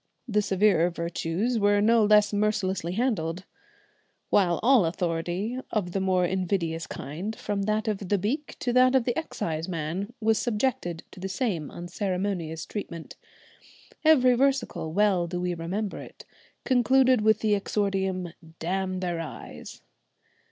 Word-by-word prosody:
The 210 -2 +2
severer 195 -3 +3
virtues 170 +7 -2
were 205 0 +3
no 225 +2 +4
less 210 0 +4
mercilessly 200 -4 0
handled, 190 -6 -1 0.9
while 175 -4 +3
all 245 -5 +5
authority 175 +7 -2
of 195 -5 -1
the 195 - -1
more 185 -1 +2
invidious 175 -3 -1
kind, 180 +10 -5
from 205 -2 -3
that 215 +1 0
of 200 -3 -2
the 205 - +3
beak 255 - -3
to 245 - 0
that 255 +1 +5
of 260 - +4
the 240 0 -1
exciseman, 170 - -3
was 220 -1 +2
subjected 210 -8 -1
to - - -12
the 190 +1 -4
same 190 - -2
unceremonious 180 -2 -3
treatment. 170 -6 -7 0.9
Every 265 -6 +6
versicle 260 -10 0
well 190 -2 +2
do 175 +1 -3
we 180 0 -1
remember 185 +5 -3
it - - -12 0.4
concluded 255 -1 +4
with 215 0 +3
the 215 -1 +2
exordium, 190 -3 -1 0.2
"Damn 185 +2 -2
their 175 -2 -2
eyes!" 165 - -9
195 Hz, 135 wpm, -27 LUFS, 175-220 Hz, 0.9 s, Every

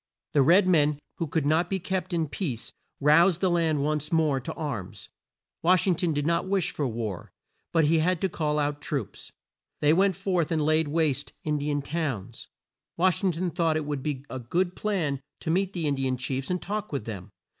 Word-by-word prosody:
The 145 - +5
red 180 +8 +5
men, 150 -4 +4 0.2
who 165 - -2
could 150 0 -1
not 160 +4 +2
be 195 - 0
kept 190 +1 -3
in 165 -2 0
peace, 140 - -3 0.3
roused 165 +5 +5
the 185 -2 +2
land 160 -4 +1
once 150 +1 -1
more 155 -5 +2
to 125 - -6
arms. 130 - -5 0.5
Wash 180 0 +4
ing 190 - +4
ton 170 0 0
did 145 -1 -1
not 170 +3 +1
wish 190 -2 +1
for 145 - -2
war, 110 -6 -4 0.4
but 165 -2 +3
he 160 +2 +3
had 175 +2 +1
to 190 - +2
call 150 -4 -1
out 145 0 -1
troops. - - -5 0.5
They 150 +1 +4
went 190 +2 +3
forth 180 -3 0
and 155 -2 +1
laid 155 0 +3
waste 145 -2 0
In 150 -1 0
di 145 +1 -2
an 145 -1 -1
towns. 140 - -4 0.5
Wash 185 +2 +2
ing 185 -2 +2
ton 175 +2 -2
thought 165 -2 +1
it 155 - -3
would 145 -2 -3
be 140 -1 -3
a 130 - -5
good 175 +9 -1
plan 165 -10 -1 0.2
to 160 - -2
meet 190 +3 +1
the 170 -3 -2
In 145 - +2
di 135 -1 -1
an 130 0 -1
chiefs 130 +1 -3
and 180 0 0
talk 210 +2 -4
with 140 -7 -3
them. 100 -3 -6
155 Hz, 215 wpm, -27 LUFS, 145-175 Hz, 0.5 s, The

